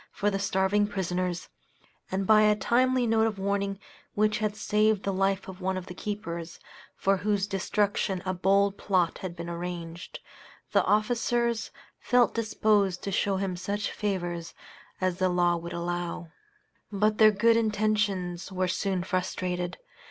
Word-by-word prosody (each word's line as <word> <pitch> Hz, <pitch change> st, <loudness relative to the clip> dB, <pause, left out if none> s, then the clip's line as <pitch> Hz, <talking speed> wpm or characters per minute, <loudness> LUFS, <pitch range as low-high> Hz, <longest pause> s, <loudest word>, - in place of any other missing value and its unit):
for 205 Hz, +1 st, 0 dB
the 195 Hz, -, -1 dB
starving 195 Hz, +1 st, +2 dB
prisoners, 180 Hz, -2 st, -2 dB, 0.6 s
and 195 Hz, +1 st, -1 dB
by 215 Hz, +1 st, +6 dB
a 210 Hz, 0 st, +5 dB
timely 255 Hz, +3 st, +2 dB
note 225 Hz, -1 st, +3 dB
of 215 Hz, -2 st, -3 dB
warning, 200 Hz, 0 st, -1 dB, 0.4 s
which 215 Hz, 0 st, +2 dB
had 215 Hz, -1 st, -1 dB
saved 210 Hz, -1 st, +1 dB
the 195 Hz, -, -1 dB
life 195 Hz, +1 st, 0 dB
of 190 Hz, 0 st, -9 dB
one 190 Hz, 0 st, -1 dB
of 185 Hz, -, -5 dB
the 180 Hz, -, -8 dB
keepers, 170 Hz, -5 st, -5 dB, 0.4 s
for 195 Hz, 0 st, +2 dB
whose 205 Hz, 0 st, 0 dB
destruction 200 Hz, -1 st, 0 dB
a 185 Hz, -, 0 dB
bold 195 Hz, +2 st, +2 dB
plot 180 Hz, -4 st, +1 dB
had 185 Hz, -2 st, -6 dB
been 170 Hz, 0 st, -6 dB
arranged 170 Hz, -1 st, -6 dB, 0.5 s
the -, -, +4 dB
officers 235 Hz, +2 st, +1 dB, 0.3 s
felt 245 Hz, -1 st, +3 dB
disposed 210 Hz, -4 st, +1 dB
to 200 Hz, -, -3 dB
show 195 Hz, 0 st, +1 dB
him 190 Hz, -1 st, -2 dB
such 205 Hz, +3 st, -3 dB
favors 175 Hz, -5 st, -3 dB, 0.4 s
as 185 Hz, -1 st, 0 dB
the 185 Hz, -1 st, +2 dB
law 175 Hz, -1 st, +2 dB
would 170 Hz, 0 st, -6 dB
allow. 175 Hz, -1 st, -3 dB, 0.6 s
But 210 Hz, +1 st, +1 dB
their 215 Hz, -1 st, +8 dB
good 225 Hz, +3 st, +3 dB
intentions 210 Hz, -5 st, 0 dB
were 185 Hz, 0 st, 0 dB
soon 185 Hz, 0 st, -1 dB
frustrated. 180 Hz, -1 st, -2 dB
195 Hz, 150 wpm, -28 LUFS, 180-210 Hz, 0.6 s, their